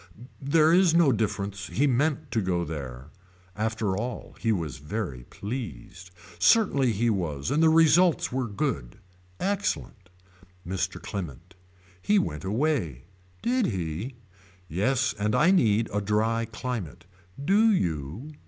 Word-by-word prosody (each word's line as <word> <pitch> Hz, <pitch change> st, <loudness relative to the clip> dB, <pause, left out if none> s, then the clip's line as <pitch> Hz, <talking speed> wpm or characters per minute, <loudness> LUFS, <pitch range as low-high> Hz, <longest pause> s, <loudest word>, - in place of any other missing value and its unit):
There 155 Hz, +3 st, +4 dB
is 180 Hz, -2 st, +5 dB
no 165 Hz, -5 st, +5 dB
difference 100 Hz, -3 st, -2 dB
he 140 Hz, -, +1 dB
meant 145 Hz, +2 st, 0 dB
to 115 Hz, -, +1 dB
go 90 Hz, -2 st, 0 dB
there. 70 Hz, -3 st, -7 dB, 0.4 s
After 110 Hz, -2 st, -1 dB
all 120 Hz, +5 st, -5 dB
he 115 Hz, -, +1 dB
was 80 Hz, -, -2 dB
very 75 Hz, -, -5 dB
pleased. 90 Hz, -, -7 dB, 0.3 s
Certainly 140 Hz, -, +4 dB
he 115 Hz, +3 st, +1 dB
was 85 Hz, -, -2 dB
and 150 Hz, +3 st, +2 dB
the 160 Hz, -, +6 dB
results 165 Hz, +2 st, +4 dB
were 130 Hz, -1 st, -1 dB
good. 100 Hz, -, -3 dB, 0.4 s
Excellent. 185 Hz, -, -2 dB, 0.6 s
Mr. 95 Hz, +1 st, -2 dB
Clement. 90 Hz, -2 st, -7 dB, 0.5 s
He 210 Hz, -, +3 dB
went 75 Hz, -, -1 dB
away. 100 Hz, -, -1 dB, 0.4 s
Did 245 Hz, 0 st, +2 dB
he. 95 Hz, -, -4 dB, 0.5 s
Yes 110 Hz, -, +1 dB
and 105 Hz, +1 st, +1 dB
I 170 Hz, +5 st, +5 dB
need 115 Hz, -, +3 dB
a 105 Hz, -, 0 dB
dry 110 Hz, +3 st, +1 dB
climate. 110 Hz, -, -5 dB, 0.4 s
Do 215 Hz, +5 st, +5 dB
you. 85 Hz, -, -2 dB
110 Hz, 130 wpm, -27 LUFS, 90-140 Hz, 0.6 s, the